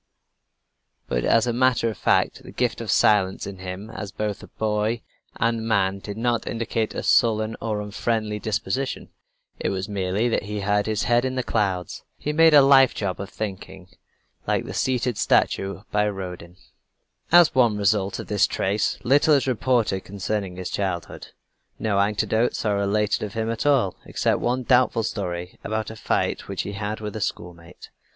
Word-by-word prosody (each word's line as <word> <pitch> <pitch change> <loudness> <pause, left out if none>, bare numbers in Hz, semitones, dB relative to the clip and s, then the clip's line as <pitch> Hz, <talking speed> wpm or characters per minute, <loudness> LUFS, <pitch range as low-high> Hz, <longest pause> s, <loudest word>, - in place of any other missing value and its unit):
But - - -1
as 115 0 +4
a 120 - 0
matter 125 -1 +2
of 110 - -2
fact - - +1
the - - -12
gift - - -1
of - - -6
silence 95 -3 +3
in 100 -1 -8
him 95 +4 -7
as 105 -4 -6
both 105 0 -4
boy 110 +1 0 0.3
and 115 0 0
man 100 -3 +1
did 100 +1 -7
not 120 0 0
indicate 115 -1 -2
a - - -3
sullen 110 -2 +3
or 110 -2 -2
unfriendly 105 +1 -2
disposition. 110 +5 -2 0.5
It - - -1
was 95 0 -3
merely 100 +2 -1
that - - +1
he 105 0 -4
had 105 +1 +1
his 110 -2 0
head 120 0 +3
in 130 0 -2
the 130 - -1
clouds. 95 -7 -2
He 150 - -3
made 160 0 +6
a 145 - +8
life 135 -1 +6
job 95 -3 -3
of 100 - -6
thinking 95 -3 -7 0.6
like - - 0
the - - -6
seated 125 -3 0
statue 95 +1 +1
by 105 0 +2
Rodin. 90 -3 -7 0.7
As 175 -1 +7
one 120 -5 +3
result 100 -1 +1
of - - -6
this 105 -1 +2
trait, 100 +3 0
little 145 +4 +4
is 140 - +1
reported 120 -6 +1
concerning 100 -1 -3
his 90 0 -5
childhood. 95 -4 -3 0.5
No 100 -3 0
anecdotes 105 +4 +1
are 105 -1 +2
related 100 +1 0
of 105 -2 -5
him 115 0 -1
at 115 +5 -2
all, 130 -10 +2
except - - 0
one 125 +2 0
doubtful 125 -2 +3
story 90 -5 -4
about 110 0 -3
a - - -9
fight - - -1
which - - -3
he - - -5
had 105 +2 -4
with 105 -1 -5
a 110 - -4
schoolmate. 85 -2 -6
105 Hz, 175 wpm, -24 LUFS, 100-115 Hz, 0.7 s, a